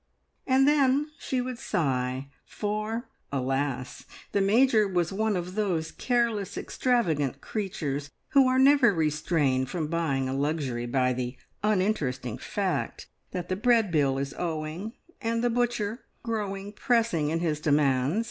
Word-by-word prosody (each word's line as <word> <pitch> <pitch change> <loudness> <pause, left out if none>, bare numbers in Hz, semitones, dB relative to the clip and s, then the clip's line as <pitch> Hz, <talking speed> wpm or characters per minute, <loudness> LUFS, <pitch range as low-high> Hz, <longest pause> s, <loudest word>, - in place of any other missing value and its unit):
And 265 +1 +4
then 290 0 +3
she 255 -2 -1
would 250 -1 -5
sigh, 130 -3 -1
for, 215 +3 -3 0.2
alas! 135 -1 -2 0.3
the 200 - +2
Major 220 +1 +4
was 180 -1 0
one 215 0 +1
of 180 +1 -4
those 180 -6 -1
careless, 230 -5 0
extravagant 165 - 0
creatures, 150 -9 -3 0.2
who 275 -2 +5
are 255 0 +2
never 265 -5 +6
restrained 150 -4 +1
from 160 -2 -2
buying 150 -6 0
a 130 - -2
luxury 135 -4 -1
by 125 0 +2
the 125 0 -4 0.2
uninteresting 160 - 0
fact 195 +4 -2 0.2
that 180 -2 -4
the 185 - -1
bread 225 -1 +3
bill 140 -4 +2
is 140 +1 -3
owing, 165 +5 -3 0.3
and 230 0 0
the 240 - +2
butcher 240 -2 -1 0.2
growing 205 -3 -3
pressing 225 - +1
in 165 +2 0
his 160 -3 0
demands. 145 - +2
180 Hz, 140 wpm, -27 LUFS, 140-225 Hz, 0.3 s, never